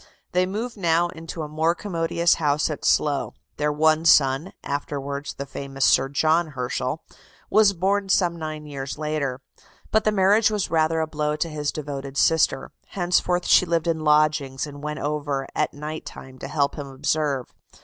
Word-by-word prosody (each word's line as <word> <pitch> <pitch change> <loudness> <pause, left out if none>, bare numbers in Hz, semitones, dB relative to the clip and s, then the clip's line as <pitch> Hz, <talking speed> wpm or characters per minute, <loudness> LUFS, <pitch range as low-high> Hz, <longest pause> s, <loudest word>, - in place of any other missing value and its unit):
They 180 +1 +2
moved 225 +5 -4
now 170 -2 +2
into 165 0 -7
a - - -5
more 160 +3 +1
commodious 170 -3 +1
house 150 +1 +1
at 150 - -6
Slough. 145 -2 +1 0.2
Their 150 0 +1
one 155 +1 +3
son, 150 +1 +4
afterwards 140 0 -4
the 140 - -5
famous 135 0 -3
Sir 135 +1 +4
John 160 +4 +2
Herschel, 125 +3 -3 0.5
was 210 -2 +5
born 195 +2 0
some 175 -3 +2
nine 155 -2 -6
years 135 -3 -6
later. 150 -4 -2 0.5
But 220 - +3
the 215 - +2
marriage 205 +2 +4
was 210 -2 -2
rather 160 0 +2
a - - +1
blow 150 -1 -1
to 165 +2 -2
his 150 -1 -2
devoted 140 -2 -6
sister: 160 -4 +2 0.2
henceforth 180 -1 0
she 185 - +5
lived 170 -1 0
in 165 -1 0
lodgings, 150 -3 +2
and 145 -1 -10
went 150 0 -4
over 145 -2 -2
at - - 0
night 150 +2 -6
time 130 0 -11
to - - -6
help 140 -2 0
him 140 - -5
observe. 140 -1 -1
155 Hz, 170 wpm, -24 LUFS, 140-170 Hz, 0.5 s, was